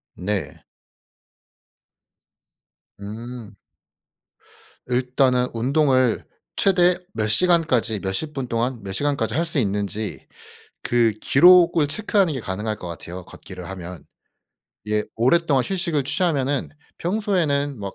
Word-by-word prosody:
네. 100 +1 -4 2.4
음. 110 +1 -8 1.3
일단은 125 0 +1
운동을 130 0 +1 0.3
최대 180 -2 +3 0.2
몇 110 -1 -1
시간까지 130 - +3
몇십 95 +12 -2
분 135 -3 -4
동안 120 +1 -2
몇 95 - -6
시간까지 145 +7 -1
할 165 +3 +1
수 160 -3 -1
있는지 105 -1 -3 0.6
그 120 -2 +2
기록을 170 0 +5
체크하는 195 +1 +1
게 130 - -4
가능할 105 +2 -3
것 90 - -9
같아요 85 +2 -8
걷기를 90 0 -10
하면. 90 -2 -8 0.8
예 105 0 0
오랫동안 135 +3 +2
휴식을 170 -5 -1
취하면은 145 -4 0 0.3
평소에는 165 - 0
막 100 -1 -6
130 Hz, 225 characters per minute, -22 LUFS, 105-160 Hz, 2.4 s, 기록을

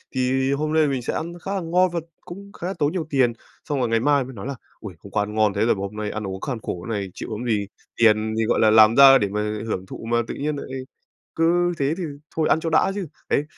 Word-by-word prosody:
Thì 130 +1 +1
hôm 150 +2 -1
nay 155 -1 +4
mình 135 -2 -1
sẽ - - -3
ăn 170 +2 -4
khá 195 - -4
là 190 - -1
ngon 180 +2 +2
và 170 - 0 0.3
cũng 200 +3 -10
khá 175 - -6
là 190 - -2
tốn 145 0 +2
nhiều 170 -4 -3
tiền. 130 -4 +2 0.4
Xong 145 -2 0
rồi 120 -3 0
ngày 115 0 +2
mai 145 +2 +3
mình 130 0 -10
nói 105 +4 -7
là 140 - -4 0.2
"Ôi! 100 -4 -8
Hôm 100 - -13
qua 105 - +1
ăn 105 +1 -6
ngon 110 -2 +3
thế - - +1
rồi - - +3
mà - - -8
hôm 100 +1 -5
nay 105 -1 -3
ăn 105 -2 -4
uống 95 0 -6
kham 125 -5 -3
khổ 90 -4 -5
thế - - -4
này, 100 -2 -2
chịu - - -7
làm 125 - -5
gì. 105 -3 0 0.3
Tiền 110 -1 +3
thì, 115 - +1
gọi - - +1
là, 110 - +5
làm 110 +1 +7
ra 135 -1 +9
để 100 - 0
mà 105 +1 -2 0.3
hưởng 95 -3 -3
thụ 110 - -9
mà, 120 - +3
tự - - -4
nhiên 150 +1 -2
lại 140 - -7 0.7
cứ 175 +2 +2
thế 140 +2 +1
thì 185 - -4 0.3
thôi, 160 -1 +1
ăn 160 - +4
cho 165 - -2
đã 160 +4 +3
chứ." 195 -4 -4 0.2
Đấy, 145 - +2
130 Hz, 285 wpm, -23 LUFS, 110-160 Hz, 0.7 s, ra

